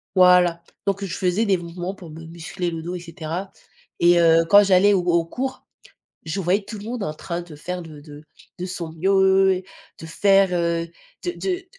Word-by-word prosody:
voilà, 180 -2 +5 0.2
donc 200 0 -1
je 180 - -5
faisais 185 +4 +1
des 200 -3 +3
mouvements 175 +2 -6
pour 175 -4 -12
me 165 +1 -10
muscler 170 +2 -5
le 165 -1 -5
dos 175 +2 -5
et - - -5
cetera 170 +2 -6 0.5
et 175 0 +5
heu, 165 -1 +5
quand 205 0 +8
j'allais 200 +1 +4
au 190 - +2
au 170 -1 +2
cours, 260 +9 -5 0.6
je 160 +5 -3
voyais 190 +3 +1
tout 210 +1 -8
le 205 - -10
monde 235 -1 -4
en 155 - -4
train 170 +2 -5
de 170 -3 -12
faire 180 +4 -5
de 155 -3 -11
de 150 0 -13 0.3
de 180 - -4
son 170 -3 -6
mieux, 190 +1 +3 0.4
de 160 - -8
faire, 195 +3 +3
heu, 170 -1 -1 0.4
de 355 - -1
de 370 0 -3
180 Hz, 200 wpm, -22 LUFS, 170-195 Hz, 0.6 s, quand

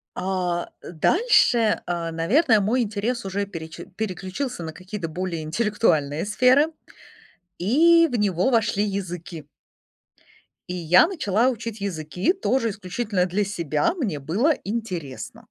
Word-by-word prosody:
А, 180 -2 -2
э, - - -9
дальше, 235 - +3
а, 170 -1 -2
наверное, 220 - +3
мой 235 +6 +1
интерес 220 +2 -3
уже 200 +1 -2
переч 160 -4 -9 0.2
переключился 195 +3 -4
на 160 - -5
какие-то 185 0 -6
более 170 0 -4
интеллектуальные 160 -4 0
сферы, 255 +8 +4 0.9
и 330 - +5
в 240 - 0
него 195 +1 +1
вошли 210 -4 +1
языки. 180 -5 -5 1.2
И 180 - -4
я 180 - +5
начала 245 - +1
учить 230 -3 -5
языки 180 - -1
тоже 265 - 0
исключительно 195 0 -2
для 190 +3 0
себя. 195 - -1
Мне 205 - -2
было 205 - +1
интересно. 185 - -5
200 Hz, 125 wpm, -23 LUFS, 175-235 Hz, 1.2 s, и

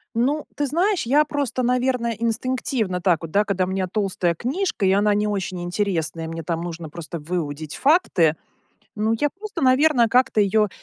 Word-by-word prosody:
Ну, 280 +6 +1
ты 290 - 0
знаешь, 355 +7 +1
я 290 +5 +4
просто, 285 -4 -2
наверное, 250 -1 +1
инстинктивно, 230 -4 -1
так 175 -3 +2
вот, 165 -1 -7
да, 205 +3 +3
когда 190 -2 0
у - - -1
меня 190 -1 -1
толстая 185 -4 -1
книжка 270 - -2
и 190 - +4
она 205 +1 +3
не 210 +1 +1
очень 190 -3 -3
интересная, 170 -4 -2
мне 165 0 -6
там 165 0 -2
нужно 170 -2 -6
просто 170 +1 -7
выудить 155 -2 -4
факты, 255 - +3 0.6
ну, 220 +1 0
я 295 -1 +1
просто, 415 -4 -7
наверно, 260 -1 +4
как-то 250 -3 +3
её 210 +1 +2
210 Hz, 175 wpm, -22 LUFS, 175-255 Hz, 0.6 s, я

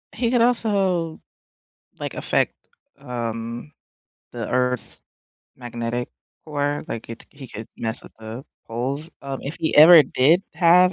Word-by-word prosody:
he 235 0 0
could 245 -2 +3
also 195 -9 +1 0.8
like - - -4
affect, - - 0 0.4
um, 115 +2 -5 0.6
the 120 -2 -5
Earth's 125 -1 0 0.6
magnetic 120 -1 -4 0.4
core, 145 -1 -2
like 115 - -6
it 115 - -9
he 140 -2 -11
could 110 0 -8
mess 115 +2 -2
with - - -14
the 110 +4 -8 0.2
poles. 135 +8 -2
Um, 135 -1 -4
if 140 +4 -5
he 160 -1 0
ever 160 +1 +10
did 160 +10 +3
have 180 +2 +5
140 Hz, 130 wpm, -23 LUFS, 120-170 Hz, 0.8 s, ever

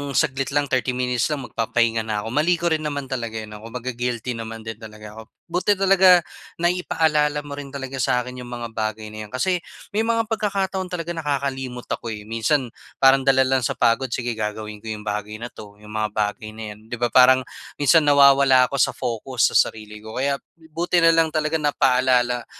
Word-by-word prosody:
saglit 135 +1 +1
lang 145 -1 +2
30 130 0 +1
minutes 125 -1 0
lang 150 -3 -3
magpapahinga 115 0 0
na 105 -1 -2
ako. - - -6
Mali 155 +7 +2
ko 170 0 -1
rin 160 - +2
naman 145 -2 -5
talaga 115 -3 -3
'yon, 110 -1 -6
'no, 105 - -9
kumbaga 125 +2 -5
guilty 120 0 -3
naman 115 -1 -6
din 110 -1 -7
talaga 110 -1 -11
ako. - - -7 0.3
Buti 185 +4 +2
talaga 190 -2 +5 0.3
na-ipaalala 160 -4 +1
mo 145 - -11
rin 145 - -7
talaga 135 -1 -6
sa'kin 125 -1 -1
yung 125 - -8
mga 120 -1 -6
bagay 110 -1 -4
na 110 0 -7
yan, - - -23
kasi 180 +7 +1 0.3
may 210 - -1
mga 230 +1 +1
pagkakataon 195 -3 -1
talaga 175 -2 -4
nakakalimot 135 -5 -3
ako, - - -3
eh. 110 -2 -5
Minsan, 115 +4 0 0.3
parang 135 0 +5
dala 135 -1 +5
lang 130 0 +2
sa 120 - -2
pagod, 115 +3 +2
sige 120 0 -3
gagawin 105 -1 -5
ko 110 - -12
yung 110 -1 -5
bagay 105 0 -4
na 120 +2 -7
'to, 105 -1 -12
yung 105 - -12
mga 110 0 -1
bagay 110 +1 -2
na 110 - -7
yan, 105 +1 -14
'di 120 - -4
ba, 120 0 -1
parang 130 0 +6 0.3
minsan 145 +2 +4
nawawala 140 -2 +6
ako 140 - -2
sa - - +2
focus, 120 +1 0
sa - - -7 0.2
sarili 105 -1 -11
ko. 110 +1 -10
Kaya, 140 0 +1 0.3
buti 175 +2 +1
nalang 165 -1 +4
talaga 155 0 0
napaalala 125 -4 +2
125 Hz, 200 wpm, -22 LUFS, 110-150 Hz, 0.3 s, parang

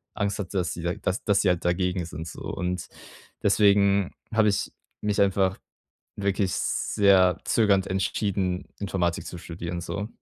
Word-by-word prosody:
Angst 100 -1 -1
hatte, 95 0 -3
dass 90 -3 0
sie 85 - -7 0.2
das 90 - -1
dass 100 -2 +3
sie 95 - +3
halt 90 -1 0
dagegen 90 0 0
sind 80 0 -7
so. - - -9
Und 90 0 -3 0.6
deswegen 100 -2 +4 0.2
habe 110 -1 +4
ich 100 - -1 0.3
mich 105 -1 0
einfach 95 -1 +2 0.6
wirklich 100 -1 0
sehr 95 -4 +3
zögernd 100 -4 +3
entschieden, 95 -1 -1
Informatik 90 -4 -1
zu 90 - -7
studieren 85 +1 -5
so. 100 +4 -4
95 Hz, 145 wpm, -26 LUFS, 90-100 Hz, 0.6 s, deswegen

